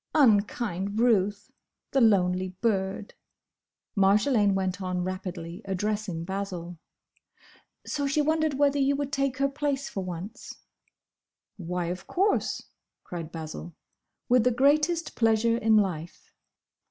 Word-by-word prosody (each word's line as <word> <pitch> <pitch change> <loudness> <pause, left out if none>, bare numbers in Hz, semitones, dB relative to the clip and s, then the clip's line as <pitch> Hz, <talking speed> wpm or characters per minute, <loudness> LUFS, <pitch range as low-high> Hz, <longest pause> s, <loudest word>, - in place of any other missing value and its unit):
"Unkind 205 - +2
Ruth! 205 -3 +2 0.4
The 270 - +2
lonely 185 -4 +3
bird!" 195 -2 -1 0.8
Marjolaine 205 +1 +3
went 190 0 -1
on 180 -1 -2
rapidly, 185 -1 -5
addressing 195 -3 -2
Basil, 180 -3 -5 1.1
"So 285 -1 -2
she 290 +3 +1
wondered 310 0 +1
whether 285 0 +2
you 275 +1 +3
would 280 0 -3
take 275 -3 0
her 275 +1 +2
place 280 0 -2
for 195 - -4
once." 180 +3 -7 1.0
"Why, 180 -1 -3
of 175 +1 -5
course!" 395 +3 0 0.4
cried 165 -2 -7
Basil. 155 - -7 0.5
"With 245 -1 +4
the 250 - +4
greatest 295 +7 +2
pleasure 225 0 +3
in 220 -1 +4
life!" 175 -5 -2
205 Hz, 115 wpm, -27 LUFS, 185-270 Hz, 1.1 s, With